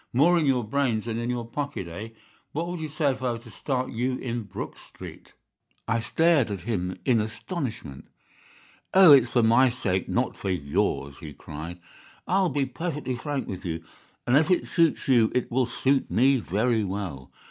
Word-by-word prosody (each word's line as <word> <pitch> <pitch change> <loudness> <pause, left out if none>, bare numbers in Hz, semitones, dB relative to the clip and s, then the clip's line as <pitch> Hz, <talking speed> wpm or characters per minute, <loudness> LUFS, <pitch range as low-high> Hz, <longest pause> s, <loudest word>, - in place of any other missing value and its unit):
More 170 +8 +4
in 155 - +1
your 130 -3 +2
brains 115 -1 0
than 115 -1 -3
in 120 +1 -3
your 120 -1 -2
pocket, 130 -6 -4
eh? 100 +7 -7 0.4
What 165 +3 -2
would 175 -1 -4
you 155 -1 -4
say 150 -1 +1
if 130 - -6
I 125 -2 0
were - - -4
to 115 0 -14
start 130 +2 -2
you 125 +2 -1
in 120 -2 -3
Brook 95 - -6
Street?' - - -12 0.5
"I 115 0 +1
stared 150 +2 +2
at 100 -3 -4
him 95 -3 -3
in 120 -5 +3
astonishment. 110 - -5 0.9
"'Oh, 190 -4 +9
it's 130 -4 +6
for 120 - +4
my 120 +4 +5
sake, 95 -7 -2
not - - 0
for 95 - -4
yours,' 70 -4 -1
he 75 -2 -9
cried. 80 +4 -8 0.5
'I'll 190 0 +2
be 140 0 0
perfectly 150 -1 -4
frank 140 +2 -3
with 95 -1 -6
you, 85 -3 -4 0.4
and 125 - +3
if 155 +4 +4
it 180 - +2
suits 165 -2 +1
you 120 -4 +4
it 125 - 0
will 125 0 +2
suit 135 +2 +1
me 135 +3 +4
very 110 +2 0
well. 95 -9 -5
120 Hz, 190 wpm, -26 LUFS, 105-140 Hz, 0.9 s, Oh